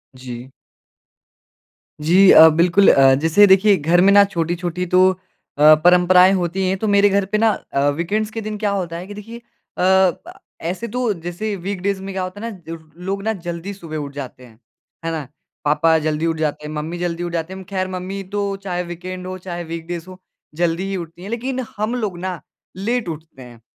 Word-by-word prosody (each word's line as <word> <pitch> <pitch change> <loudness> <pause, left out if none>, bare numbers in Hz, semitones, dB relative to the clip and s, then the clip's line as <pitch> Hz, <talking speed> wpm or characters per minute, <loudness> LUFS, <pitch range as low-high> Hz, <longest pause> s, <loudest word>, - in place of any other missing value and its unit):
जी। 125 0 -9 1.6
जी 170 +3 +3 0.2
अ, 160 - +9
बिल्कुल 175 +5 +4
अ, 135 -1 +6
जैसे 165 +6 +5
देखिए 195 +2 +5
घर 170 +3 +2
में 195 +2 +5
ना 205 - +8
छोटी-छोटी 175 +1 -2
तो 185 +1 +4
अ, 155 -4 +2
परम्पराएँ 180 +1 +6
होती 185 +1 -1
हैं 190 - 0
तो 215 +3 -2
मेरे 205 0 +4
घर 200 0 +1
पे 205 +3 -1
ना 225 +1 +3 0.2
अ, 140 +1 +2
वीकेंड्स 200 +9 -2
के 225 - -5
दिन 215 0 -5
क्या 205 -1 -1
होता 180 -4 -3
है 180 +2 -8
कि 205 - -8
देखिए 225 +3 -10 0.4
अ, 190 0 +4 0.5
ऐसे 185 +7 -4
तो 240 -1 -1
जैसे 175 +5 -5
वीकडेज़ 195 +1 -3
में 195 0 -6
क्या 190 -1 -2
होता 185 +3 -7
है 230 - -4
ना 165 -4 -9 0.3
लोग 195 +1 -3
ना 220 +1 0
ज 195 - -10
जल्दी 175 +3 -5
सुबहे 165 -5 -8
उठ 145 -2 -6
जाते 135 -2 -8
हैं, 115 -2 -19 0.5
है 165 - -1
ना? 155 -4 -4 0.4
पापा 160 +2 +3
जल्दी 155 +1 -1
उठ 165 -1 -1
जाते 150 -1 -2
हैं, 150 - -6
मम्मी 155 +3 -4
जल्दी 175 -1 -3
उठ 175 - -4
जाते 165 +2 -3
हैं। - - -8
अम, - - -9
खैर 185 -1 -2
मम्मी 185 +1 -5
तो 200 -1 -2
चाहे 180 -2 -3
वीकेंड 180 +1 -7
हो 185 0 -5
चाहे 175 -1 -6
वीकडेज़ 165 0 -6
हो 185 - -11 0.4
जल्दी 170 +2 0
ही 195 - -2
उठती 170 0 -9
हैं 195 - -7
लेकिन 250 +3 -3 0.2
हम 215 +4 -1
लोग 210 -7 -3
ना, 185 -1 -5 0.3
लेट 220 +1 -2
उठते 155 -4 -9
हैं। 120 -2 -13
180 Hz, 205 wpm, -20 LUFS, 165-200 Hz, 1.6 s, अ